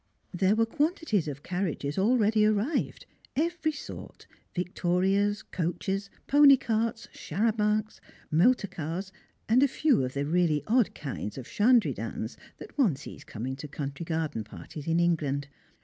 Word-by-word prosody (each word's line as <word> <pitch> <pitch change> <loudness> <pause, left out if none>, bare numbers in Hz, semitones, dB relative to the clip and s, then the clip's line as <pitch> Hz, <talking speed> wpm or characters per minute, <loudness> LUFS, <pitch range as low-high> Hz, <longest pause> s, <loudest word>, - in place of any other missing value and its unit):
There 190 +3 +3
were 225 +1 +3
quantities 295 - 0
of 145 0 -6
carriages 175 -6 -2
already 215 0 +3
arrived, 215 +8 0 0.3
every 325 +1 0
sort 295 - -9 0.3
victorias, 190 +3 +1
coaches, 195 +3 -3 0.2
pony 285 -1 +7
carts, 225 -1 -1
charabancs, 215 +3 0 0.3
motor 200 +9 +4
cars, 180 +2 -5 0.4
and 235 +4 +4
a 280 - +6
few 275 - +2
of 130 +1 -4
the 140 +1 0
really 160 -1 +2
odd 235 0 +2
kinds 135 -7 -5
of 130 - -7
shandrydans 235 +2 +1 0.2
that - - -11
one 210 - +4
sees - - -10
coming 125 +4 -5
to 150 - -7
country 145 +2 -5
garden 160 -8 -2
parties 145 +7 -10
in 165 +1 +2
England. 145 -5 +1
195 Hz, 135 wpm, -28 LUFS, 155-225 Hz, 0.4 s, pony